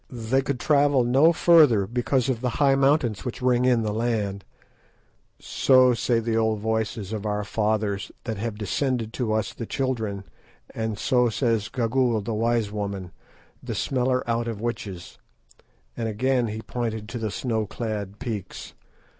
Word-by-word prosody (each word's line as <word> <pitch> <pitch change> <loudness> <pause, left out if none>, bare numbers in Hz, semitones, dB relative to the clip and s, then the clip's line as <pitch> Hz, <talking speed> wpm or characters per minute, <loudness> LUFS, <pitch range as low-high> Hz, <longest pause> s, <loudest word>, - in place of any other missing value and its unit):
"They 125 +2 0
could 135 -2 -3
travel 145 -3 +3
no 135 +7 +5
further 155 - +5
because 125 +4 0
of 125 -4 -1
the 125 - 0
high 140 -2 +4
mountains 135 -5 +2
which 125 - -5
ring 125 -1 +2
in 120 -3 +3
the 105 -1 -1
land, 105 -4 -1 1.0
so 130 -2 +4
say 120 0 +1
the 115 0 -1
old 110 -1 +1
voices 110 -1 -2
of 105 -2 -4
our 105 -1 -1
fathers 105 -1 -1
that 110 -3 -4
have 110 0 -4
descended 115 +2 -1
to 120 -4 -2
us 110 0 -1
the 115 - -7
children, 110 -7 -2 0.5
and 110 -2 -3
so 125 +2 +2
says 115 -2 0
Gagool, 120 -1 +1
the 110 +3 -4
wise 115 -1 0
woman, 100 -3 -4 0.5
the - - -5
smeller 130 -1 0
out 115 0 0
of 115 -3 -4
witches," 105 -6 -5 0.8
and 115 -2 -2
again 125 +3 +1
he 110 +1 -5
pointed 110 -3 -4
to 120 - -5
the 110 -1 -2
snow 110 -1 -2
clad 105 -3 -4
peaks. 110 -6 -6
115 Hz, 160 wpm, -25 LUFS, 105-125 Hz, 1.0 s, no